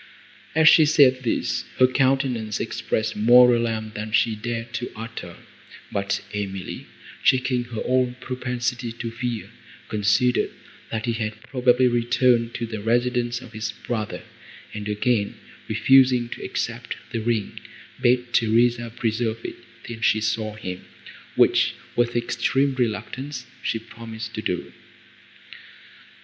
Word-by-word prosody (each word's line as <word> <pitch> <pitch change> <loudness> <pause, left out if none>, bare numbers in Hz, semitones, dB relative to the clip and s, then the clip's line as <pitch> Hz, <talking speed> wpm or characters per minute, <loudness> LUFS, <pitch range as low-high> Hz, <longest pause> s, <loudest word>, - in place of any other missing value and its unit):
As 160 0 +5
she 160 - +8
said 140 -4 +5
this, 120 - -1
her 130 - +7
countenance 130 -4 +1
expressed 110 0 -2
more 120 +3 +7
alarm, 115 -2 -1
than 105 +1 -5
she 110 0 +2
dared 115 +2 -5
to 125 - -4
utter; 110 -6 -7 0.5
but 100 0 -1
Emily, 95 -2 -5 0.4
checking 130 -1 +2
her 120 -2 -5
own 125 -1 +1
propensity 125 -2 -3
to 115 0 -5
fear, 120 -1 -4 0.4
considered, 105 +4 +2 0.4
that 110 0 -3
he 120 - 0
had 110 -1 -4
probably 125 0 +3
returned 120 0 +2
to 120 - -2
the 110 -2 -6
residence 120 +1 0
of 125 -3 -12
his 110 +1 -3
brother, 110 -3 -4 0.5
and, 105 0 -5
again 105 0 0 0.3
refusing 130 -3 +4
to - - -7
accept - - -3 0.2
the 115 - -2
ring, 110 -2 -1 0.4
bade 125 0 +2
Theresa 120 +1 +3
preserve 115 0 -1
it, - - -5 0.3
till 115 -1 -8
she 110 - +3
saw 110 -1 -1
him, 90 -4 -6 0.5
which, - - +4 0.2
with 120 0 +1
extreme 125 +3 +1
reluctance, 125 +2 -3 0.2
she - - -1
promised 115 0 -8
to 110 - -4
do. 90 -4 -3
120 Hz, 130 wpm, -24 LUFS, 110-125 Hz, 0.5 s, she